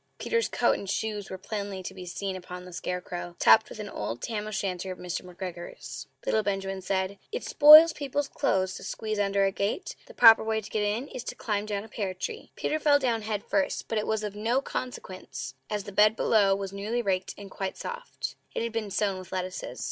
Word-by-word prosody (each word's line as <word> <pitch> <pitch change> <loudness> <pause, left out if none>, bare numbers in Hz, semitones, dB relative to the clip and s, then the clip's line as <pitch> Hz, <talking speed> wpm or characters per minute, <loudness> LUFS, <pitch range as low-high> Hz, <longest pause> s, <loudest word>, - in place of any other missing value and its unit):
Peter's 465 -1 0
coat - - +2
and 200 - -7
shoes 210 -1 -2
were 190 - -5
plainly 200 -1 -5
to 190 - -6
be 185 -1 -9
seen 190 +2 -3
upon 180 0 -8
the 180 - -11
scarecrow, 180 -1 -4
topped 220 -1 +6
with - - -9
an 210 -1 -5
old 115 - -4
tam 215 -2 -3
o' - - -4
shanter 190 -3 -2
of 185 - -6
Mr. 180 -1 -4
McGregor's. 180 -1 -8 0.2
Little 220 - +2
Benjamin 195 -1 -2
said: 190 +1 -1
"It 470 +3 -3
spoils 310 +2 +9
people's 285 0 -2
clothes 190 -10 0
to - - -10
squeeze 215 -1 -3
under 200 -1 +2
a 195 - +2
gate; 200 - -2
the - - -14
proper 225 -2 +8
way 220 0 0
to 215 - -10
get 215 - 0
in 210 +6 -1
is 245 - -6
to - - -5
climb 210 -1 -2
down 205 -1 -2
a - - -11
pear 200 -4 -3
tree." 445 - -6
Peter 310 - -1
fell 290 -1 +5
down 240 -5 0
head 210 -1 -3
first; 285 -1 0
but 225 - 0
it 210 - -3
was 220 -1 0
of 210 -1 -3
no 230 +5 +1
consequence, 190 - -6 0.2
as 210 -1 -2
the 205 - -8
bed 210 +2 +5
below 200 -4 +4
was 195 -1 -5
newly 215 +5 -2
raked 190 -2 -1
and 200 -1 -10
quite 195 -1 -4
soft. 485 +1 -5 0.2
It - - 0
had 230 - -2
been 220 -2 -3
sown 195 -1 0
with 185 0 -11
lettuces. 185 0 -4
205 Hz, 225 wpm, -28 LUFS, 190-225 Hz, 0.2 s, spoils